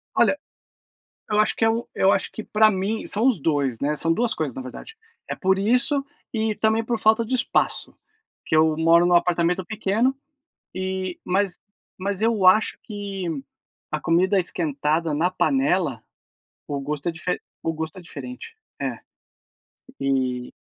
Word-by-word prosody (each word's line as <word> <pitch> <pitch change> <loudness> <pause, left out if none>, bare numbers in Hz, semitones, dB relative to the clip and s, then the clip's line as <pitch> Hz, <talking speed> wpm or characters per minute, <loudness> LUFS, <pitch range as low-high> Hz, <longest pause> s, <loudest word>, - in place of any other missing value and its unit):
Olha - - +4 0.9
Eu, 210 - +2
acho 215 - +2
que 225 - +1
é 225 - +5
o 230 +1 -2
eu 190 - +4
acho 195 - 0
que 220 - -6
pra 215 0 +4
mim 200 +3 -2
são 215 +4 +1
os 245 - +3
dois, 140 -6 0
né, 150 +2 0
são 165 +2 +1
duas 235 +6 +1
coisas, 150 -6 -3
na 130 - -5
verdade. 130 - -10 0.3
É, - - -2
por 190 0 +1
isso 250 +7 +2 0.3
e 220 -1 0
também 220 +1 +2
por 235 0 -1
falta 220 +1 +4
de 255 +3 -2
espaço. 245 - 0 0.5
Porque 155 - 0
eu 155 0 +4
moro 165 +2 +5
num 175 - +3
apartamento 175 +1 +2
pequeno, 220 +5 0 0.6
e 185 -1 -3
mas 190 -1 0 0.4
mas, 200 +1 -2
eu 220 -4 +3
acho 200 +4 +5
que 200 -3 -5 0.6
a 155 - -2
comida 185 +4 +3
esquentada 160 -2 -1
na 165 +5 +1
panela, 185 - +1 0.7
o 145 -1 -2
gosto 145 +3 -3
é - - -1
dife 170 +2 -2 0.2
o 165 - -1
gosto 160 +2 -5
é - - -8
diferente. 255 - -9 0.3
É. - - -3 1.0
E 130 -2 -1
185 Hz, 165 wpm, -24 LUFS, 160-220 Hz, 1.0 s, é